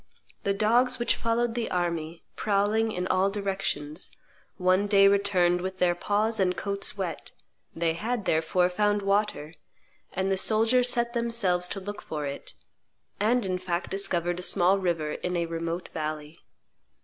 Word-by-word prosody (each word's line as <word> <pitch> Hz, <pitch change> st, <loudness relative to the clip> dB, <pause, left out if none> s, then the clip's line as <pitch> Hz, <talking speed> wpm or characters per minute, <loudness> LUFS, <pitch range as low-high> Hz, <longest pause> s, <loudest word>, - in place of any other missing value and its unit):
The 200 Hz, -, 0 dB
dogs 240 Hz, +5 st, +3 dB
which 240 Hz, -, +1 dB
followed 230 Hz, 0 st, 0 dB
the 235 Hz, -1 st, -2 dB
army, 170 Hz, -2 st, -2 dB
prowling 215 Hz, +2 st, +1 dB
in 180 Hz, -3 st, -3 dB
all 190 Hz, +1 st, +2 dB
directions, 195 Hz, -6 st, -3 dB, 0.5 s
one 185 Hz, +2 st, +2 dB
day 200 Hz, -1 st, +6 dB
returned 190 Hz, -3 st, +3 dB
with 190 Hz, +1 st, -4 dB
their 180 Hz, -1 st, +3 dB
paws 210 Hz, +5 st, 0 dB
and 180 Hz, -1 st, +1 dB
coats 200 Hz, 0 st, -1 dB
wet; 185 Hz, -4 st, -4 dB, 0.4 s
they 165 Hz, 0 st, +1 dB
had, 220 Hz, +4 st, -3 dB
therefore, 165 Hz, +3 st, +2 dB
found 205 Hz, +2 st, +1 dB
water; 195 Hz, -6 st, 0 dB, 0.6 s
and 190 Hz, +1 st, -1 dB
the 190 Hz, -, +1 dB
soldiers 230 Hz, +5 st, +3 dB
set 235 Hz, -1 st, +1 dB
themselves 230 Hz, -7 st, +1 dB
to 195 Hz, -, -4 dB
look 205 Hz, +2 st, -7 dB
for 150 Hz, -2 st, -5 dB
it, 140 Hz, 0 st, -6 dB, 0.7 s
and, 225 Hz, +2 st, +2 dB
in 185 Hz, -1 st, -1 dB
fact, 180 Hz, -1 st, -3 dB
discovered 175 Hz, -3 st, 0 dB
a -, -, -4 dB
small 180 Hz, +2 st, +3 dB
river 170 Hz, -5 st, -1 dB
in 180 Hz, +3 st, -3 dB
a 170 Hz, -, 0 dB
remote 165 Hz, +1 st, -4 dB
valley. 155 Hz, 0 st, -5 dB
190 Hz, 155 wpm, -27 LUFS, 175-210 Hz, 0.7 s, day